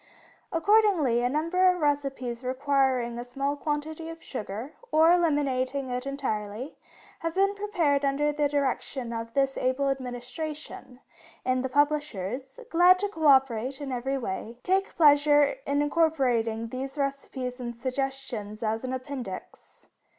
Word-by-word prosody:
Accordingly, 335 - +3
a 245 - +1
number 335 +6 +3
of 360 0 +1
recipes 275 -5 -1
requiring 260 -2 +1
a - - -4
small 275 +3 -2
quantity 310 +2 -3
of 330 0 -10
sugar, 225 +3 -6 0.2
or 320 +2 +6
eliminating 280 -6 +1
it 250 +2 -3
entirely, 245 -2 -3 0.4
have 330 +1 -3
been 395 +1 +3
prepared 355 -9 0
under 285 +2 +1
the 295 -1 0
direction 265 -3 -2
of 230 0 -5
this 270 -1 +1
able 260 +2 +1
Administration, 260 +1 -6 0.4
and 255 0 +1
the 260 - -2
publishers, 280 - -1
glad 355 +2 +6
to 410 +2 -1
co 320 -6 0
operate 265 -1 +3
in 280 -2 -5
every 265 +2 -1
way, 230 0 -5
take 385 +1 0
pleasure 290 -2 +5
in 285 +1 +2
incorporating 255 -8 +1
these 265 +3 -5
recipes 270 -2 -3
and 240 -1 -5
suggestions 255 -4 -4
as 220 +1 -1
an 255 0 -3
Appendix. 255 -6 -7
275 Hz, 135 wpm, -27 LUFS, 250-300 Hz, 0.4 s, or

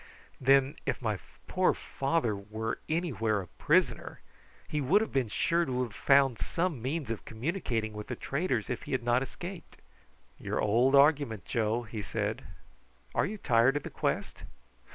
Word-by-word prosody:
"Then 135 +1 +4
if 135 - 0
my 110 -5 -1 0.3
poor - - +2
father 135 -5 -1
were 110 +3 -4
anywhere 130 - 0
a 95 - -5
prisoner, - - +1 0.5
he 150 - -1
would 160 +10 +4
have 220 - -2
been 135 -3 +1
sure 170 +10 +1
to 130 -4 -1
have 115 -4 -6
found 135 -1 +4
some 170 -7 -1
means 135 0 -2
of 115 - -4
communicating 115 - -2
with 105 0 -7
the - - -3
traders 135 - -1
if 125 - -3
he - - -2
had 130 - 0
not 120 +1 +3
escaped." 175 +6 -7 0.6
"Your - - -2
old 120 +6 +3
argument, 140 - +4
Joe," 115 +1 0
he 110 -1 -6
said. - - -3 0.7
"Are - - +2
you 215 - -5
tired 125 - +3
of 145 - -4
the - - -7
quest?" - - -2
130 Hz, 165 wpm, -30 LUFS, 110-145 Hz, 0.7 s, Then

